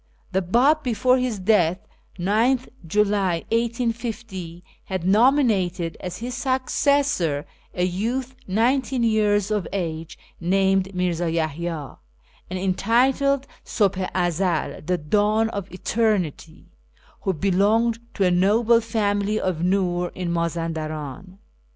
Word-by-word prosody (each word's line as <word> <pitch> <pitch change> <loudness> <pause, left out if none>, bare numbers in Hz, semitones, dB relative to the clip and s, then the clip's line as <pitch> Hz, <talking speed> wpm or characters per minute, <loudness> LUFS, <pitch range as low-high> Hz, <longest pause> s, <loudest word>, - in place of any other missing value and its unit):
The 190 - +1
Bab, 250 - +3
before 255 +1 +2
his 250 -4 -1
death 185 -3 +2 0.4
(9th 225 +8 +1 0.2
July 200 -2 +1
1850), 230 -6 -3 0.2
had 185 -3 -4
nominated 200 - +2
as 180 - -6
his 245 +2 -5
successor 260 - +1 0.3
a 180 - 0
youth 235 +9 -2
nineteen 245 +5 +1
years 210 -2 +2
of 205 -6 -1
age 165 -4 -4 0.2
named 190 +1 +1
Mirza 175 -1 0
Yaliya, 160 -2 -3 0.5
and 185 - -3
entitled 255 +9 +2 0.2
Subh 200 -4 +1
i 180 -1 +1
Ezel 175 -3 -1
("The 180 0 +1
Dawn 210 +7 +1
of 200 -3 -6
Eternity"), 185 -6 -1 0.6
who 195 - 0
belonged 205 +7 +2 0.2
to 195 - +1
a 180 - +3
noble 220 +6 +4
family 210 -2 0
of 180 -4 -2
Nur 180 -1 +1
in 180 -2 -3
Mazan 170 -1 -1
daran. 155 +3 -6
195 Hz, 115 wpm, -23 LUFS, 175-230 Hz, 0.6 s, noble